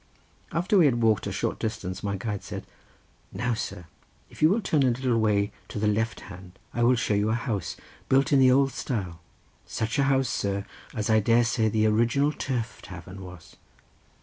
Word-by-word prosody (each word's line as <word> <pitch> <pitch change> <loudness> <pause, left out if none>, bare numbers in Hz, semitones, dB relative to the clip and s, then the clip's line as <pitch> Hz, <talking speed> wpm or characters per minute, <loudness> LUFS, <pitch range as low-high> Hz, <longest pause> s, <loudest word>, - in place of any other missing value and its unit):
After 180 +4 +2
we 170 - +6
had 120 -4 +2
walked 110 -3 +2
a - - -3
short - - -2
distance 100 -4 -4
my 100 -1 -2
guide 105 0 -4
said, - - -7 0.7
"Now, 120 0 -1
sir, 90 -5 -5 0.5
if - - -14
you 155 - +6
will 205 +6 +2
turn 155 -8 +1
a 135 - +4
little 125 -1 +1
way 105 -2 +2 0.2
to - - -7
the 105 - 0
left 110 +2 0
hand 90 +1 -12 0.2
I 120 - -2
will 120 +2 +5
show 115 -2 0
you 105 +1 +1
a 110 - +2
house 100 -6 -3 0.3
built 135 +4 +3
in 140 - +6
the 130 -1 +6
old 135 +1 +4
style, 95 -12 -4 0.5
such 110 +5 -2
a 140 - +4
house, 135 -1 +2
sir, 100 -3 -2 0.3
as 110 0 -1
I 110 - +5
dare 115 +3 +4
say 115 -2 +1
the 110 0 +1
original 120 +7 +2
turf 120 -7 -3
tavern 95 +1 -10
was." 90 -3 -12
110 Hz, 200 wpm, -26 LUFS, 100-130 Hz, 0.7 s, we